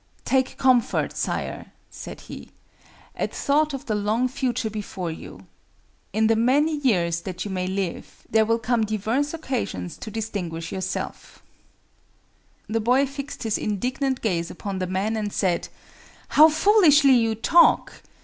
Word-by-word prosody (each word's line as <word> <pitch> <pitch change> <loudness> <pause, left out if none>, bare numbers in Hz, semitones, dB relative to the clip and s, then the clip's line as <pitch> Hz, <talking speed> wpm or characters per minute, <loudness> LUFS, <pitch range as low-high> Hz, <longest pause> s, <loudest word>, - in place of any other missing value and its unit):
"Take 260 -1 +1
comfort, 255 -3 +2
Sire," - - -4 0.2
said - - -9
he, - - -10 0.7
"at - - -3
thought 300 +2 +2
of 275 -2 -6
the 220 - -1
long 215 +4 +1
future 250 -3 -2
before 195 -5 -5
you. 160 - -10 0.7
In 220 0 +1
the 225 +1 +4
many 285 +7 +2
years 175 - +1
that 180 0 -5
you 205 - -5
may 185 -1 -2
live, 190 -2 -4
there 220 0 +3
will 230 +1 +1
come 230 0 0
divers 220 +7 -1
occasions 240 - -4
to - - -7
distinguish 185 -7 -4
yourself." 190 0 -5 1.2
The 225 +1 -1
boy 250 +5 +3
fixed 280 +1 -7
his 220 -2 -1
indignant 255 +6 -2
gaze 175 -6 -1
upon 195 +1 -5
the 185 - -2
man 195 +4 -1
and 210 -2 -2
said—"How 195 - +1
foolishly 310 -5 +5
you 225 -3 +2
talk! 335 +10 +3
225 Hz, 140 wpm, -24 LUFS, 195-265 Hz, 1.2 s, foolishly